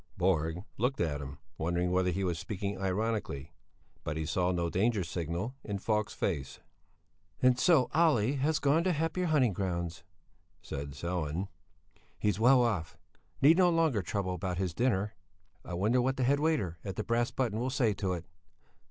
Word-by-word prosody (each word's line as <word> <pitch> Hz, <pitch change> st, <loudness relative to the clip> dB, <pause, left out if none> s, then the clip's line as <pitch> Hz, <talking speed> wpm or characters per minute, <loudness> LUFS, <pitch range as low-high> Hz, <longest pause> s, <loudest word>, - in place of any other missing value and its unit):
Borg 85 Hz, -1 st, +1 dB, 0.2 s
looked 125 Hz, +4 st, 0 dB
at 75 Hz, -4 st, -1 dB
him, 70 Hz, 0 st, -7 dB, 0.2 s
wondering 85 Hz, +2 st, 0 dB
whether 90 Hz, 0 st, +2 dB
he 95 Hz, +2 st, -1 dB
was 85 Hz, -3 st, -1 dB
speaking 100 Hz, 0 st, -4 dB
ironically, 95 Hz, -7 st, -2 dB, 0.5 s
but 75 Hz, +1 st, -3 dB
he 80 Hz, -, -2 dB
saw 90 Hz, +3 st, +1 dB
no 85 Hz, -1 st, 0 dB
danger 100 Hz, +4 st, +1 dB
signal 85 Hz, +7 st, -3 dB
in 100 Hz, -2 st, -3 dB
Falk's 105 Hz, +1 st, -1 dB
face. 70 Hz, -9 st, -2 dB, 0.8 s
"And 125 Hz, -1 st, +4 dB
so 145 Hz, -4 st, +5 dB
Olle 145 Hz, -8 st, +3 dB
has 150 Hz, +3 st, +1 dB
gone 145 Hz, +4 st, +3 dB
to 185 Hz, -, +3 dB
happier 165 Hz, +4 st, -1 dB
hunting 135 Hz, -9 st, +3 dB
grounds," 85 Hz, -3 st, -3 dB, 0.6 s
said 70 Hz, 0 st, -5 dB
Sellén. 85 Hz, +3 st, -3 dB, 0.7 s
"He's 105 Hz, -1 st, 0 dB
well 125 Hz, +2 st, +6 dB
off, 85 Hz, -8 st, -1 dB, 0.5 s
need 160 Hz, +4 st, +7 dB
no 180 Hz, -1 st, +5 dB
longer 165 Hz, -, +2 dB
trouble 95 Hz, 0 st, -2 dB
about 90 Hz, 0 st, -3 dB
his 90 Hz, -3 st, -1 dB
dinner. 105 Hz, -1 st, 0 dB, 0.5 s
I 90 Hz, -, -5 dB
wonder 110 Hz, +8 st, +2 dB
what 130 Hz, +2 st, 0 dB
the 130 Hz, -, +1 dB
head 140 Hz, +3 st, +3 dB
waiter 140 Hz, -, 0 dB
at 95 Hz, -3 st, -5 dB
the -, -, -2 dB
'Brass 120 Hz, +1 st, +1 dB
Button' 115 Hz, -5 st, -1 dB
will 125 Hz, +2 st, -1 dB
say 125 Hz, -5 st, +2 dB
to 95 Hz, -1 st, -2 dB
it? 85 Hz, -2 st, -5 dB
100 Hz, 170 wpm, -31 LUFS, 85-125 Hz, 0.8 s, need